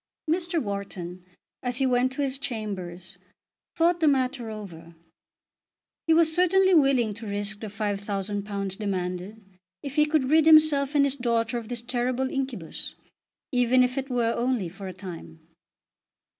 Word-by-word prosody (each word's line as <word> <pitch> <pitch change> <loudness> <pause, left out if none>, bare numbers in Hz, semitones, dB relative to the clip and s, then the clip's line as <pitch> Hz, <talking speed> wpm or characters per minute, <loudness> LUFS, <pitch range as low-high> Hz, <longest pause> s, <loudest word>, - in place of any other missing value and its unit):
Mr. 340 +1 0
Wharton 195 - -5 0.4
as 245 -1 -1
he 270 - +2
went 255 0 +2
to 285 - -1
his 270 -1 -1
chambers 190 -7 -4 0.6
thought 340 +1 +3
the 320 - +3
matter 255 -4 +1
over. 170 -6 -9 1.1
He 325 - +5
was 325 -1 +4
certainly 375 +2 +4
willing 270 -8 +4
to 225 +1 -8
risk 205 +1 -3
the 220 - -6
£5000 200 -1 -3
demanded 190 +1 -3 0.4
if 280 0 -6
he 300 0 +5
could 300 -3 +1
rid 315 0 +5
himself 305 -3 +6
and 280 -1 +5
his 275 -1 0
daughter 235 -2 0
of 225 - -10
this 240 0 -4
terrible 255 +1 -1
incubus, 260 - -4 0.6
even 250 0 +4
if 250 0 0
it 270 0 -3
were 235 -2 +1
only 240 -7 -1
for 195 +2 -9
a - - -5
time. 170 -3 -9
240 Hz, 150 wpm, -26 LUFS, 200-275 Hz, 1.1 s, himself